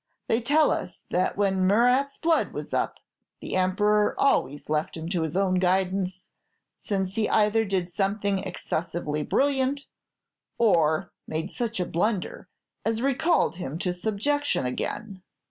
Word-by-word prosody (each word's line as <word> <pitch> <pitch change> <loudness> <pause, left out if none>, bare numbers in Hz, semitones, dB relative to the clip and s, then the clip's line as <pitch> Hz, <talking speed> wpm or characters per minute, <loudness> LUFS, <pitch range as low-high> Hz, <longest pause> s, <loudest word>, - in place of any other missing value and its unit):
They 225 - +2
tell 295 +6 +3
us - - -4
that 180 +2 0
when 190 -2 +2
Murat's 250 +7 +3
blood 325 -1 +1
was - - -6
up, - - 0 0.4
the - - -5
Emperor 210 +3 +2
always 145 - +1
left 155 +2 -1
him 160 0 -5
to 175 -2 0
his 160 0 -3
own 185 -2 +2
guidance, 185 0 0 0.5
since 190 -2 -2
he 220 - +1
either 215 +1 +3
did 190 -3 -1
something 195 +2 0
excessively 170 -4 -3
brilliant, 275 - +1 0.7
or 165 -9 +3 0.2
made 160 +4 -3
such 230 -4 -3
a 180 - 0
blunder 185 +3 -2 0.3
as 225 +1 -1
recalled 275 - +2
him 155 -4 -4
to 180 0 -1
subjection 220 - -1
again. 190 - -4
195 Hz, 140 wpm, -26 LUFS, 180-225 Hz, 0.7 s, tell